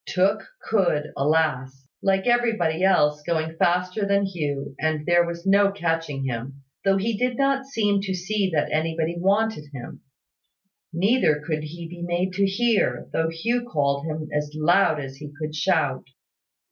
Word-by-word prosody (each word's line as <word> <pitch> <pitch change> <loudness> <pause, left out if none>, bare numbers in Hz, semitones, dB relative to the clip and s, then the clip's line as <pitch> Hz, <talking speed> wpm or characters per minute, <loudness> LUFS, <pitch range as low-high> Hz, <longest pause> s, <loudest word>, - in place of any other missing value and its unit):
Tooke 195 +3 +1 0.2
could, 175 -8 0
alas! 135 -3 0
Like 195 0 +1
everybody 220 -9 +1
else, 150 -6 +3
go 160 0 -2
faster 180 +5 +1
than 200 0 +2
Hugh; 145 -7 -3
and 155 0 -1
there 175 0 +4
was 170 +1 -6
no 200 +1 +4
catching 165 -7 -2
him, 135 +2 -5 0.2
though 195 0 +3
he 220 +3 -1
did 250 +2 -1
not 275 -1 +1
seem 205 -6 +1
to 190 -1 -2
see 195 +2 -1
that 155 -4 0
anybody 160 +1 -1
wanted 200 -2 +1
him. 125 -4 -9 0.9
Neither 175 -2 +2
could 155 -1 -1
he 165 +2 -7
be 175 +1 -10
made 175 +2 -1
to 200 +1 +2
hear, 230 +3 0
though 160 0 +1
Hugh 230 +10 -1
called 140 0 0
him 155 0 -4
as 150 0 -1
loud 160 +1 +3
as 135 -1 -7
he 145 0 -9
could 155 -1 -4
shout. 155 -4 +1
170 Hz, 160 wpm, -24 LUFS, 150-195 Hz, 0.9 s, there